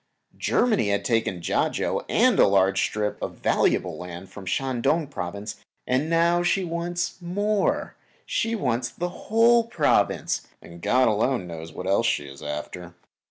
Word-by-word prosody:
Germany 215 - +2
had 100 0 0
taken 115 -7 0
Kiachau - - 0
and - - +3
a - - +7
large 95 -1 +3
strip 105 -1 -2
of - - -4
valuable - - +1
land 90 +1 -8
from 100 -1 -10
the - - -3
Shan 130 +1 -1
Tung 160 +6 +2
Province, 100 -6 -6 0.3
and 130 +5 0
now 170 +1 +3
she 180 +2 +1
wants 175 +1 -3
more; 205 +4 0 0.3
she 230 0 -1
wants 125 - -1
that 170 +10 -4
whole 230 +5 +3
Province, 230 - +1
and 85 0 -13
God 130 +6 +3
alone 110 0 +1
knows 80 -1 -8
what 90 - -7
else 95 +1 +2
she 75 - 0
is 70 0 -11
after. 85 +4 -6
120 Hz, 160 wpm, -25 LUFS, -, 0.3 s, a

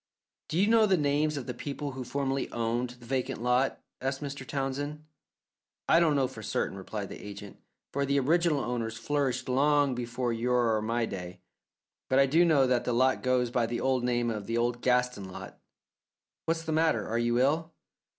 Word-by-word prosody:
"Do 160 - -2
you 195 - +4
know 220 0 +5
the 190 -2 +3
names 150 0 +1
of 135 - -4
the 125 - -4
people 145 +3 -5
who 130 -1 -6
formerly 135 +1 -2
owned 120 +1 -1
the 125 -1 -13
vacant 130 +1 -2
lot?" 125 +2 +1 0.2
asked 135 +1 -2
Mr. 140 -2 -6
Townsend. 145 +2 -3 0.8
"I 165 - +6
don't 160 -3 +3
know 135 -2 +2
for - - -10
certain," - - -2
replied 100 +1 -5
the - - -9
agent, 100 -1 -9 0.3
"for 140 - 0
the 140 0 +2
original 160 +1 +2
owners 115 -3 -3
flourished 135 0 -1
long 140 +1 +3
before 120 0 -2
your 120 -1 +2
or 110 - 0
my 115 +2 0
day, 90 -3 -7 0.7
but 130 - +3
I 135 - +6
do 160 +6 +4
know 155 -6 +4
that 125 -2 +2
the 125 - -1
lot 130 +2 +3
goes 125 -2 +1
by 120 -2 +1
the 120 0 -3 0.2
name 120 -1 0
of 105 -3 -5
the 115 - -1
old 120 +1 0
Gaston 125 -6 +1
lot. - - -9 0.9
What's 165 0 -1
the 160 - -3
matter? 155 -9 +2
Are 115 +1 -1
you 120 0 +1
ill?" 155 +6 +1
130 Hz, 190 wpm, -29 LUFS, 120-145 Hz, 0.9 s, I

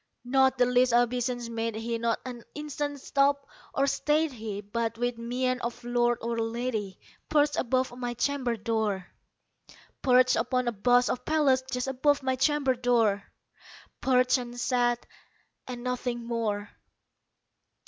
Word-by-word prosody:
Not 265 +1 +3
the 250 - +5
least 250 0 +3
obeisance 245 0 +1
made 230 -1 -3
he; 230 +1 -3
not 230 -1 0
an 245 -2 -7
instant 290 -1 -4
stopped 280 +1 +1 0.3
or 275 - +3
stayed 295 +3 +1
he; 220 -5 -5
But, 225 +2 -3
with 245 0 -2
mien 250 +2 -1
of 235 +1 -5
lord 240 0 +1
or 230 0 -1
lady, 225 -4 -3 0.3
perched 295 -1 +3
above 255 0 0
my 245 -1 -4
chamber 255 -3 0
door 215 -4 -1 1.0
Perched 255 0 +4
upon 255 -1 0
a - - +2
bust 245 +4 +3
of 250 - -4
Pallas 290 -4 +3
just 250 0 -2
above 275 +2 +1
my 260 0 +1
chamber 280 0 +2
door 235 -5 +2 0.8
Perched, 255 0 +3
and 245 0 -7
sat, 240 -1 +1 0.6
and 245 -1 -6
nothing 245 -1 -3
more. 215 -3 -2
245 Hz, 140 wpm, -28 LUFS, 235-260 Hz, 1.0 s, the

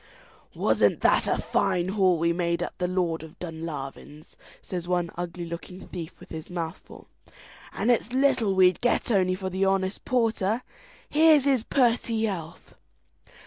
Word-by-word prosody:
"Wasn't - - +2
that - - +3
a - - +1
fine 185 -2 0
haul 190 -3 +3
we 170 +1 +1
made 170 -1 0
at - - -6
the 180 - 0
Lord 180 -3 -1
of 160 +3 -12
Dunlavin's!" 155 -3 -7 0.2
says 175 -2 -6
one 175 -2 0
ugly 175 0 -5
looking 170 +2 -8
thief 165 -3 -7
with - - -14
his 160 -1 -7
mouth 170 -1 -4
full, - - -15 0.7
"and 225 +5 +1
it's 240 -1 0
little 255 -6 +2
we'd 185 -2 +4
get 245 0 +1
only 185 -3 +2
for 190 0 -5
the 190 +1 -1
honest 195 0 0
porter! 230 -2 0 0.4
here's 305 -2 +5
his 265 -5 +2
purty 235 -3 +1
health!" 170 -6 -6
185 Hz, 155 wpm, -26 LUFS, 170-220 Hz, 0.7 s, here's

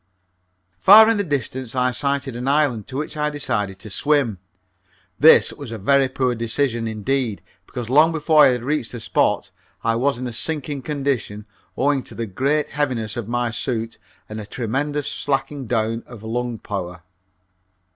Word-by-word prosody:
Far 215 - +9
in 225 - +1
the 205 - +1
distance 130 - -3
I 125 0 +2
sighted 140 0 -2
an 125 +2 -4
island, 140 -7 +1
to 130 - -6
which 150 +2 -4
I 150 0 0
decided 105 -10 -2
to 105 +1 -10
swim. 135 -5 +1 0.8
This 160 +2 +6
was 140 -6 -9
a 115 - -4
very 135 +6 +3
poor 130 -1 0
decision, 115 0 -1
indeed, 110 +1 -2 0.2
because 120 -3 -6
long 150 +6 +5
before 155 -1 +5
I - - +7
had 125 -2 0
reached 140 -3 -2
the 120 - -5
spot 115 - 0 0.3
I 115 - +1
was 135 +3 +1
in 130 - -5
a 120 - -4
sinking 145 +1 -3
condition 130 -8 -2 0.3
owing 140 0 +2
to - - -10
the 115 - -3
great 140 +9 0
heaviness 125 -7 -2
of 120 -4 -4
my 120 0 -1
suit 115 -1 -3 0.3
and 110 0 -6
a 105 - -9
tremendous 135 +6 -2
slacking 135 -1 -2
down 115 0 0
of 115 -3 -12
lung 120 +1 -3
power. 90 -4 -6
125 Hz, 170 wpm, -21 LUFS, 115-145 Hz, 0.8 s, Far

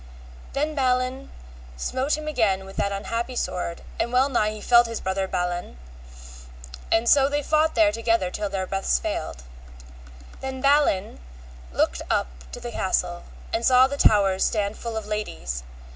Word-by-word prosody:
Then 300 +2 -1
Balin 255 -1 0 0.5
smote 260 - -1
him 305 0 -7
again 210 -10 +1
with 195 - -11
that 200 - 0
unhappy 230 +5 -3
sword, 175 -6 -3 0.2
and 235 - 0
well 255 +2 +3
nigh 215 -5 +1
had 215 - -9
felled 240 -1 +6
his 230 -1 -4
brother 190 0 -1
Balan, 175 - -3 1.1
and 225 +1 +3
so 275 +2 +5
they 290 0 -1
fought 310 +2 +2
there 215 -3 +5
together 225 -4 0
till 210 +1 -3
their 190 -1 -2
breaths 195 - 0
failed. 65 +1 -4 1.0
Then 265 0 -5
Balin 275 - +2 0.5
looked - - 0
up - - +1 0.2
to - - -7
the - - -6
castle 65 - -1 0.3
and 230 - 0
saw 255 +1 +6
the 275 +2 -2
towers 195 -7 +4
stand 205 -1 0
full 230 -1 -5
of 220 - -4
ladies. 205 - -4
225 Hz, 160 wpm, -24 LUFS, 195-260 Hz, 1.1 s, felled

